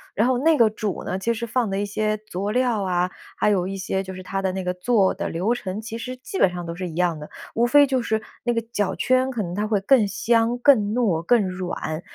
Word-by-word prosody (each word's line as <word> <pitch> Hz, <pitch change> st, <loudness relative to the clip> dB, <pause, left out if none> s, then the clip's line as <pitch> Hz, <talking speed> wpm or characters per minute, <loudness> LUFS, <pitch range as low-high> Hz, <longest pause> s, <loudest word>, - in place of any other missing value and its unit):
然 220 Hz, +4 st, +3 dB
后 255 Hz, -1 st, +2 dB
那 315 Hz, +3 st, +4 dB
个 230 Hz, -, +6 dB
煮 215 Hz, -2 st, -4 dB
呢， 185 Hz, -, -2 dB
其 235 Hz, +5 st, 0 dB
实 230 Hz, +1 st, -4 dB
放 235 Hz, -1 st, 0 dB
的 195 Hz, 0 st, -1 dB
一 205 Hz, -, -1 dB
些 215 Hz, +1 st, -1 dB
佐 205 Hz, -1 st, -4 dB
料 245 Hz, -3 st, +1 dB
啊， 180 Hz, -1 st, 0 dB, 0.3 s
还 210 Hz, -, +2 dB
有 185 Hz, -3 st, +1 dB
一 195 Hz, 0 st, -4 dB
些 190 Hz, 0 st, -2 dB
就 190 Hz, -1 st, -7 dB
是 185 Hz, -, -8 dB
它 195 Hz, +1 st, -3 dB
的 190 Hz, -1 st, 0 dB
那 190 Hz, 0 st, -4 dB
个 180 Hz, 0 st, -1 dB
做 195 Hz, +1 st, +2 dB
的 -, -, -4 dB
流 185 Hz, +8 st, 0 dB
程， 205 Hz, -5 st, -4 dB
其 220 Hz, +1 st, -7 dB
实 255 Hz, +3 st, -6 dB
基 320 Hz, +9 st, -6 dB
本 190 Hz, -, +5 dB
上 175 Hz, -1 st, -6 dB
都 170 Hz, 0 st, -5 dB
是 180 Hz, 0 st, -4 dB
一 160 Hz, -, -9 dB
样 175 Hz, -2 st, +1 dB
的。 150 Hz, -, -9 dB, 0.2 s
无 235 Hz, -, +2 dB
非 285 Hz, +3 st, +6 dB
就 260 Hz, -1 st, +1 dB
是 220 Hz, -2 st, -1 dB, 0.2 s
那 240 Hz, -, +1 dB
个 230 Hz, -, 0 dB
脚 205 Hz, -4 st, 0 dB
圈 255 Hz, +1 st, +2 dB
可 225 Hz, -5 st, -2 dB
能 175 Hz, -, -5 dB
它 205 Hz, +3 st, -1 dB
会 210 Hz, -2 st, +1 dB
更 220 Hz, +2 st, +4 dB
香、 230 Hz, +4 st, +1 dB
更 235 Hz, -5 st, +4 dB
糯、 205 Hz, -10 st, +1 dB
更 215 Hz, +2 st, +3 dB
软， 175 Hz, -3 st, -4 dB
210 Hz, 280 characters per minute, -23 LUFS, 185-235 Hz, 0.3 s, 个